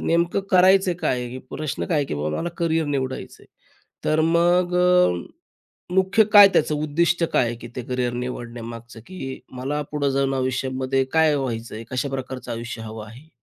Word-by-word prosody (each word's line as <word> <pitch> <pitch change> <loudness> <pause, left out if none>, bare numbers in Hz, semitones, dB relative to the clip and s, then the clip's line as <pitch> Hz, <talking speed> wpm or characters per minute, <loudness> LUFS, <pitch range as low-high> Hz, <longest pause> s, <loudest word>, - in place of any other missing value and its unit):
नेमकं 170 +3 +1
करायचं 190 0 +5
काय 125 - 0
आहे? 125 - -5
की 130 - -6
प्रश्न 155 -1 -3
काय 165 - 0
आहे 145 - +1
की - - -4
बाबा 75 +1 -2
मला 170 - -2
करियर 165 -2 0
निवडायचं 130 -2 -4
आहे? - - -18 0.6
तर 155 +1 +2
मग 175 +2 +2
अ, 180 - +2 0.6
मुख्य 190 +3 +4
काय 205 -2 +10
त्याचं 150 - +2
उद्दिष्ट 165 +3 +1
काय 125 - +3
आहे 120 - -2
की 120 +1 -10
ते 125 - -3
करियर 125 0 -2
निवडण्यामागचं 120 -1 -7
की 135 -8 -7 0.2
मला 140 +4 -2
पुढं 145 -2 0
जाऊन 135 0 0
आयुष्यामध्ये 130 0 -1
काय 160 -2 +4
व्हायचं? 120 -5 -4
आहे 110 +1 -7
कशा 130 +2 -1
प्रकारचं 130 -1 -5
आयुष्य 115 0 -6
हवं 110 -1 -8
आहे? 125 +8 -14
135 Hz, 180 wpm, -23 LUFS, 120-170 Hz, 0.6 s, काय